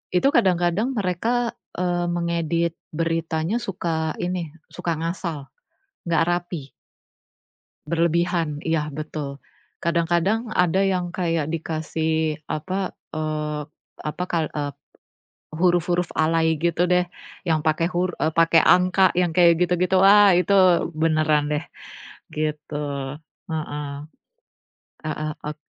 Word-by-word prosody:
Itu 180 - +4
kadang-kadang 180 +6 +2
mereka, 230 +3 -1 0.2
eee, 175 -1 0
mengedit 170 -1 0 0.2
beritanya 165 +3 -1
suka 160 -4 -2
ini, 175 -3 -3 0.2
suka 180 -1 -4
ngasal, 165 -4 -4 0.6
nggak 165 -2 +2
rapi. 175 -5 -3 1.2
Berlebihan, 170 -1 +1
iya 155 -2 0
betul. 145 -1 -5 0.4
Kadang-kadang 170 +7 +1
ada 180 -2 +2
yang 185 -2 0
kayak 165 -4 0
dikasih 160 -1 -1
apa, 185 +5 -2 0.2
eee, 155 -1 -2 0.4
apa, 155 +4 -4
kal 165 -3 -1
eee, 145 -1 -3 0.8
huruf-huruf 175 +1 +1
alay 160 0 +2
gitu 170 +2 +1
deh 180 0 +3 0.4
yang 160 -2 +1
pakai 155 +2 +1
hur 180 +1 +1
eee, 155 0 0
pakai 165 0 +5
angka 185 +1 +5
yang 175 -1 +2
kayak 170 +1 +6
gitu-gitu, 180 +1 +2
ah 200 0 +7
itu 180 +3 +1 0.5
beneran 155 -2 +3
deh 150 - -1 0.7
gitu, 155 0 -3 0.8
heeh. 150 -2 -3 1.2
Heeh 155 0 -3
ok 150 +1 -5
170 Hz, 105 wpm, -23 LUFS, 155-180 Hz, 1.2 s, ah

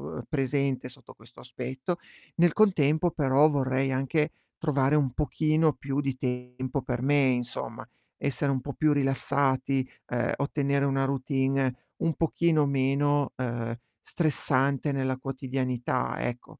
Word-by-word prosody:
uhm, - - -5
presente 135 -2 0
sotto - - -15
questo 110 +2 -18
aspetto. 130 +7 -4 0.4
Nel 175 0 +4
contempo 170 -5 +3
però 145 0 +4
vorrei 135 -2 0
anche 135 +4 0 0.3
trovare 145 -2 +2
un 140 -5 +2
pochino 155 +2 +2
più 135 +1 -3
di 135 -2 -2
tempo 125 +1 -3
per 125 -1 -3
me, 145 +2 +3
insomma, 125 -1 -3 0.3
essere 140 0 -1
un 135 - 0
po' 140 +2 -6
più 155 +2 +2
rilassati, 135 -1 +1 0.2
ehm, 120 -1 0
ottenere 140 -1 0
una 135 -1 +1
routine 135 -1 0 0.3
un 165 - +1
pochino 165 -2 +2
meno, 140 +1 +1
ehm, 120 -2 -2 0.3
stressante 140 -3 +1
nella 130 -1 0
quotidianità, 130 -1 -2
ecco. 120 0 -5
135 Hz, 130 wpm, -28 LUFS, 130-145 Hz, 0.4 s, Nel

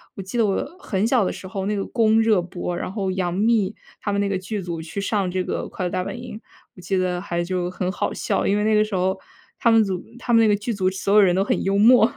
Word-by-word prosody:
我 195 - -6
记 195 +6 -5
得 225 - +4
我 195 - 0
很 200 - -1
小 240 -3 +3
的 - - 0
时 185 - -8
候 190 +1 -4
那 210 - 0
个 195 - -1
《宫》 225 -2 +3
热 215 -5 +3
播， 175 0 -5
然 180 - -4
后 195 -3 -2
杨 185 -2 -1
幂 215 +1 +1 0.3
她 205 - -2
们 200 - 0
那 200 - +1
个 195 -1 -1
剧 205 +2 -4
组 170 -2 -5
去 160 +5 -6
上 200 -2 0
这 185 0 -1
个 - - -3
《快 185 - -4
乐 - - 0
大 185 0 -1
本 240 - -6
营》。 230 -3 -7 0.4
我 180 - -13
记 190 +2 -1
得 180 -1 0
还 175 -3 -2
就 180 0 -2
很 180 0 -2
好 - - -2
笑， - - -1
因 205 - +2
为 210 - 0
那 215 0 +2
个 210 0 +5
时 210 -2 -4
候 190 +1 0 0.4
她 235 - +3
们 225 -1 +6
组 185 -3 -3
她 245 -1 -2
们 230 - +6
那 225 - +5
个 210 - +4
剧 220 +3 -3
组 185 -2 +1
所 195 +1 -1
有 210 - +8
人 180 -2 +4
都 195 - +2
很 - - 0
幽 195 +1 +1
默。 235 +2 +6
195 Hz, 310 characters per minute, -23 LUFS, 185-215 Hz, 0.4 s, 有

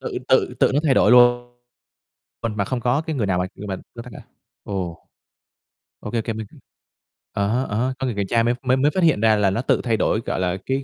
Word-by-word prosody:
tự - - -4
tự - - +2
tự - - +4
nó 145 - +3
thay 140 - +3
đổi - - +4
luôn, 120 0 +4 0.9
mà 105 -3 -2
không 125 +5 -2
có 125 +5 +1
cái 160 -1 -4
người 115 -6 0
nào 90 -2 0
mà 90 - 0
người 105 - -8
mà 95 - -3 0.2
nó 115 - -8
tắt 125 - -12
hả? - - -9 0.4
Ồ. 90 -5 -5 0.9
Ô 105 - -7
kê 115 - 0
kê, 115 - -4
mình 110 -1 -6 0.9
à 100 0 0
há, 120 +5 0
á 105 -4 -4
há, 130 +2 0
có 135 - -2
người 120 -5 -2
kiểm 100 -1 -2
tra 115 -1 +2
mới 120 +1 +2
mới 130 0 +2
mới 145 +3 +2
phát 185 +2 0
hiện 150 -10 +3
ra 110 -1 +4
là 105 -2 +2
nó 95 +5 -1
tự 130 - +1
thay 115 -3 0
đổi, 110 +2 0
gọi - - -2
là, 90 0 -1
cái 135 +1 -1
115 Hz, 255 wpm, -22 LUFS, 105-130 Hz, 0.9 s, tự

